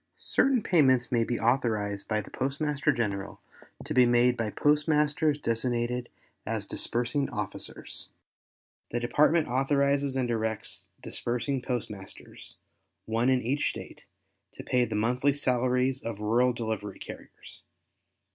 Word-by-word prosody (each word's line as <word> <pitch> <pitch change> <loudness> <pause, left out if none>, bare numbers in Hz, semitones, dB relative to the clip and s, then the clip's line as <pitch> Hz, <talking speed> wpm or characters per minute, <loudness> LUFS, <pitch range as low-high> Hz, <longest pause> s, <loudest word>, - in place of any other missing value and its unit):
—Certain 265 -5 +2
payments 130 -8 +3
may 120 -2 +3
be 120 +1 -2
authorized 110 -5 0
by 110 -1 +1
the - - -13
Postmaster 140 +2 0
General 100 -4 -3 0.5
to - - -3
be 125 -1 +6
made 120 +1 +4
by 115 -3 -2
postmasters 150 +2 +2
designated 120 -1 -1 0.3
as - - -2
disbursing 125 +4 0
officers. 105 -2 -6 0.8
The 120 - -1
Department 150 +6 +3
authorizes 140 +1 +1
and 130 -2 0
directs 110 -2 -2 0.2
disbursing 125 +3 -2
postmasters, 110 -6 -6 0.5
one 115 +3 +1
in 130 -1 +2
each 135 +5 +1
State, - - -9 0.5
to - - -9
pay 125 -1 +2
the - - -4
monthly 125 +6 +2
salaries 130 -1 +1
of 115 -3 -5
rural 120 +4 +3
delivery 110 -4 -4
carriers. - - -11
125 Hz, 125 wpm, -28 LUFS, 115-140 Hz, 0.8 s, be